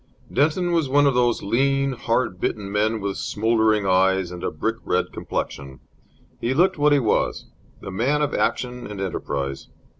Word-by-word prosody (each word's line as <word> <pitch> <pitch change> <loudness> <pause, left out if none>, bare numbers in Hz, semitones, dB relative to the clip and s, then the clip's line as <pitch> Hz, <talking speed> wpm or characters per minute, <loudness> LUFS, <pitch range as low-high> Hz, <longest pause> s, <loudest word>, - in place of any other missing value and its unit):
Denton 160 +6 +2
was 165 -5 +1
one 145 +2 +4
of 140 - +4
those 120 -1 +1
lean, 135 +5 +1
hard 120 -6 -1
bitten 100 -2 -2
men 110 +1 0
with 100 -1 -3
smouldering 110 -1 +1
eyes 95 -1 +2
and 90 -1 -8
a - - 0
brick - - -2
red - - -1
complexion. 70 -2 -5 0.6
He 125 +3 -1
looked 180 +1 +3
what 150 0 +4
he 145 - +5
was, 120 -6 0 0.4
the - - -7
man 135 +10 +1
of 145 - -1
action 125 0 -1
and 105 -1 -7
enterprise. 70 -7 -3
115 Hz, 170 wpm, -23 LUFS, 95-140 Hz, 0.6 s, he